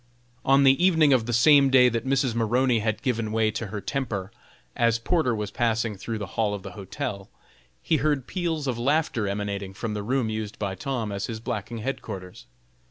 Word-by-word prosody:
On 135 +1 +4
the 135 +5 +5
evening 160 -6 +5
of 120 -3 +2
the - - -1
same 140 +4 +6
day 130 -1 +6
that 115 +1 -1
Mrs. 130 -2 +1
Maroney 120 +2 +2
had 110 +3 -2
given 115 -5 -1
way 110 -1 +2
to 110 +1 -4
her 105 +1 -5
temper, 100 -4 -3 0.4
as 115 -1 +2
Porter 125 0 +1
was 105 -1 -4
passing 115 -2 0
through 110 +4 -5
the 105 - -4 0.2
hall 105 -2 +1
of 100 - -8
the 95 - -7
hotel, 100 +2 -6 0.5
he 160 - +2
heard 145 -3 0
peals 165 -3 -2
of 125 -3 -2
laughter 135 -4 +1
emanating 100 -1 -3
from 110 +1 -4
the 105 - -3
room 125 +3 0
used 110 -1 -4
by 100 -2 -2
Tom 115 +2 -3
as 100 0 -3
his 115 -2 -5
blacking 115 0 -4
headquarters. 95 - -6
115 Hz, 195 wpm, -25 LUFS, 105-135 Hz, 0.5 s, same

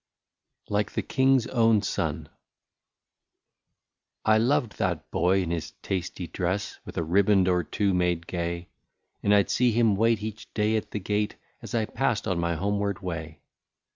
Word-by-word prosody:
'' - - -60
83 - - -8
LIKE 105 - 0
THE - - 0
KING'S 130 -2 +3
OWN 115 -3 +4
SON. - - -2 2.0
I 110 0 +5
LOVED 125 -1 +1
that - - -1
boy, 95 +3 +2
in 85 - -3
his 85 -2 -3
tasty 90 -1 -3
dress, 90 +3 -3
With - - -9
a 85 - +1
riband 95 +3 +3
or 90 -1 +2
two 100 +5 0
made 90 -2 +1
gay; 85 0 -4 0.5
And 100 - +1
I 100 -1 +6
'd - - -6
see 125 -1 +3
him 115 -2 +3
wait 115 +1 +2
each 110 +1 -7
day 105 +1 +2
at 110 - -2
the 105 - -3
gate, 105 +2 -1 0.3
As - - -6
1 110 -2 +1
passed 130 -6 0
on 95 -4 0
my 85 0 0
homeward 100 +2 -1
way. 80 -3 -5
100 Hz, 170 wpm, -27 LUFS, 90-110 Hz, 2.0 s, I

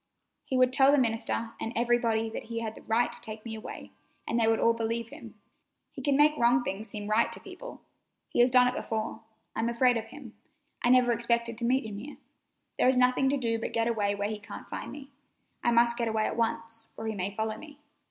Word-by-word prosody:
He 260 - -1
would 255 0 +4
tell 270 +1 +6
the 290 - +4
minister 230 -2 0
and 225 - -3
everybody 235 -1 +1
that - - -6
he 230 0 -4
had 220 -1 -4
a - - -12
right 230 +2 +1
to - - -8
take 215 0 -7
me 225 - -5
away, 220 0 -8 0.4
and 235 - 0
they 225 - +3
would 225 0 +3
all 230 - +4
believe 230 0 -2
him. - - -11 0.6
He 270 - -8
can 275 +1 +2
make 300 +1 +5
wrong 245 +1 +4
things 210 0 -4
seem 205 0 -6
right 215 +2 +3
to - - -5
people. - - -10 0.4
He - - -3
has 245 +1 +6
done 250 0 +5
it 250 - 0
before. 220 -1 -3 0.3
I'm 225 +1 0
afraid 245 +1 +3
of 225 0 -5
him. 245 -2 -11 0.5
I 240 - +2
never 250 -1 +5
expected 235 0 0
to 235 - -2
meet 255 +1 +2
him 205 -2 -6
here. 285 +7 -9 0.6
There - - +5
is 260 - +2
nothing 255 +1 +3
to 285 - +1
do 230 -3 -1
but - - -4
get 230 0 +1
away 205 -3 0
where 200 0 -1
he 215 -1 -4
can't 210 - -9
find - - -6
me. 280 -1 -10 0.5
I - - +3
must 235 0 +3
get 235 -1 0
away 220 -1 0
at - - -2
once, 230 0 -2
or 225 - -6
he 220 - -2
may 200 0 -4
follow 220 0 -2
me. 295 -2 -12
230 Hz, 235 wpm, -29 LUFS, 225-250 Hz, 0.6 s, tell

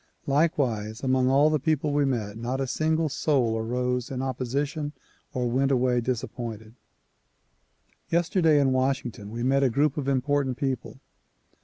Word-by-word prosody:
Likewise 125 -7 0
among 130 -1 +2
all 145 +3 +4
the 155 - +2
people 150 0 0
we 145 0 +2
met, 110 -6 -2
not 120 +4 -3
a 135 - 0
single 155 +4 0
soul 135 -6 +1
arose 125 +2 -1
in 130 - -4
opposition 140 +4 -2 0.4
or 125 -1 -1
went 130 +3 +1
away 125 -2 +2
disappointed. 115 -2 -4 1.4
Yesterday 165 -2 +3
in 135 -2 +3
Washington 130 -5 -1
we 115 +2 -4
met 135 +2 +3
a 135 - +4
group 140 +4 +1
of 140 -2 -2
important 135 -1 +1
people. 135 -4 -3
130 Hz, 145 wpm, -26 LUFS, 120-145 Hz, 1.4 s, all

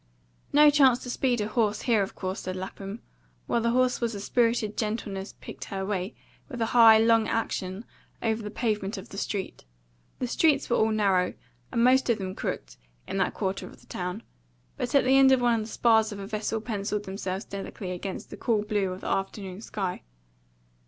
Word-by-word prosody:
"No 295 +1 +7
chance 270 -4 +5
to 245 - -4
speed 245 -3 +1
a 210 - -1
horse 215 -2 0
here, 230 -5 +3
of 195 - -3
course," 185 0 -4
said 185 0 -4
Lapham, 195 +3 -7 0.4
while 235 - +1
the 235 - +1
horse 250 +1 +2
with 230 -2 -1
a - - -5
spirited 230 0 +1
gentleness 210 -3 -3
picked - - -8
her 195 -1 -4
way, 195 +1 -3 0.3
with 250 -4 -6
a 225 - +2
high, 225 -2 +9
long 225 0 +4
action, 195 -2 -2 0.3
over 225 -1 0
the 210 - -5
pavement 210 -2 -2
of 195 +4 -9
the 195 - -9
street. 200 -3 -4 0.5
The 255 - -2
streets 280 +1 +2
were - - +4
all 220 - +3
narrow, 195 -4 +2 0.4
and 235 - +2
most 255 +1 +4
of 235 - +3
them 190 -2 -4
crooked, - - -5 0.3
in - - -4
that 195 - 0
quarter 195 -1 -2
of - - -14
the - - -20
town; 180 +4 -5 0.5
but 245 - -3
at 280 - +6
the 265 +1 +4
end 265 0 +7
of 260 - +5
one 240 -2 +2
the 215 - -5
spars 220 -1 +3
of 205 - -6
a 200 - -6
vessel 215 +1 -2
pencilled 210 -2 -2
themselves 190 0 -4
delicately 195 -1 -6
against 185 +2 -6
the - - -7
cool 220 -4 +1
blue 205 -3 0
of 185 - -7
the - - -6
afternoon 195 0 -3
sky. 195 -5 -4
215 Hz, 200 wpm, -27 LUFS, 195-235 Hz, 0.5 s, high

